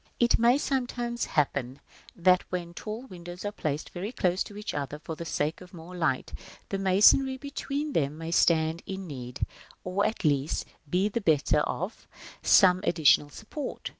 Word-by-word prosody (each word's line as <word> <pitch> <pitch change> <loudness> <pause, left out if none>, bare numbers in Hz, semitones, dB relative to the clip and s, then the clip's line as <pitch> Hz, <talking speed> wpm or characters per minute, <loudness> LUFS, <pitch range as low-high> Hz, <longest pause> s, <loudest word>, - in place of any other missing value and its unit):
§ - - -38
VIII. - - -33
It 235 - +3
may 240 +3 +5
sometimes 245 -4 -2
happen 140 -3 -1 0.4
that 180 +1 +4
when 175 -2 -4
tall 215 +6 -6
windows 175 -3 -9
are 205 - -1
placed 150 -7 -3
very 190 +5 -4
close 185 -6 0
to 205 - -10
each 210 - -4
other 145 0 -3
for 160 +1 -7
the 170 - -7
sake 155 +1 -2
of 180 0 -12
more 170 +2 -10
light, 160 -7 -1 0.4
the 195 - -2
masonry 210 +8 +5
between 280 +1 -4
them 145 0 0
may 165 +1 -5
stand 160 -1 +3
in 190 0 -5
need, 125 -5 -5 0.4
or 185 +2 0
at 215 0 -1
least 145 0 +1 0.2
be 185 +5 +2
the 220 +3 -2
better 150 -4 +3
of, 180 +7 -3 0.3
some 185 -2 +6
additional 155 -5 +4
support. 225 - -6
180 Hz, 175 wpm, -28 LUFS, 155-210 Hz, 0.4 s, some